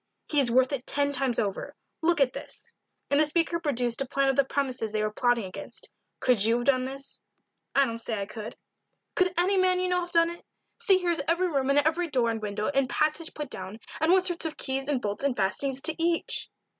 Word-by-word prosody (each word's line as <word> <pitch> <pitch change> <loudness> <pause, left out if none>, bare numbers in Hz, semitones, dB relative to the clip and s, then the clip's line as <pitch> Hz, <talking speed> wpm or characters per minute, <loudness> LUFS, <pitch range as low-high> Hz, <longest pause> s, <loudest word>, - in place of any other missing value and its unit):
"He 295 - +2
is 265 -4 +4
worth 255 +3 +3
it 265 -2 -4
ten 285 0 +1
times 265 -3 0
over. 200 -2 -2 0.3
Look 335 0 +2
at 270 -2 +3
this," - - -6 0.4
and 285 - +4
the - - +6
speaker 330 +2 +1
produced 250 -6 -1
a 270 - -1
plan 275 0 +1
of 270 - +1
the 275 - +4
premises 260 -5 -2
they 215 0 -1
were 215 - -1
plotting 245 -1 +2
against. 185 -1 -8 0.3
"Could 245 -6 +3
you 225 +2 +4
have 240 0 -2
done 255 -1 +3
this?" 275 +1 -6 0.6
"I 275 - +5
don't 230 -2 -5
say 225 -2 -3
I 200 - -2
could." 215 +2 -8 0.6
"Could 365 0 +2
any 375 +3 +3
man 370 -1 +3
you 365 0 0
know 360 0 +2
have 350 0 -5
done 335 -1 +3
it? 345 - -11 0.4
See 385 -2 +5
here 355 -2 0
is 335 - 0
every 350 +2 +2
room 275 -4 0
and 275 - +3
every 320 +4 +2
door 245 -5 +1
and 225 -1 -4
window 210 0 -2
and 275 -2 +1
passage 310 +2 -1
put 295 -3 -5
down, 190 +4 -7 0.2
and 320 +2 +3
what 370 0 +4
sort 350 -3 0
of 315 -1 -4
keys 270 0 -3
and 290 -3 +1
bolts 205 +1 -3
and 280 -3 0
fastenings 265 +7 +1
to 320 - +2
each." 335 0 0
275 Hz, 235 wpm, -27 LUFS, 240-330 Hz, 0.6 s, the